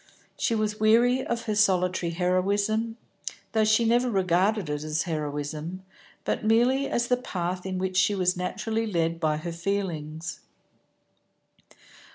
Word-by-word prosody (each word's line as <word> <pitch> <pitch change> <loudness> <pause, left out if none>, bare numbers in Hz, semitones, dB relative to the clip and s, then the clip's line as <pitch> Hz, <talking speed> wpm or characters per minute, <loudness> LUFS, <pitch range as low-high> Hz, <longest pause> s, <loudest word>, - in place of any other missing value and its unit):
She 230 - 0
was 215 -1 -1
weary 240 +4 +4
of 235 -1 -2
her 215 - -1
solitary 185 -4 +2
heroism, 200 +6 0 0.5
though 220 -1 +2
she 215 +2 +3
never 240 +2 +3
regarded 190 0 +1
it 150 0 -3
as 155 +1 -1
heroism, 155 +2 -4 0.4
but - - -1
merely 245 +5 +3
as 240 0 0
the 250 - +2
path 180 -5 -4
in 185 -1 -3
which 185 0 -2
she 200 +2 +3
was 180 -1 +2
naturally 220 +5 -2
led 165 -4 0
by 155 -2 +1
her 170 +3 -5
feelings. 165 -3 -3
190 Hz, 140 wpm, -26 LUFS, 170-220 Hz, 0.5 s, weary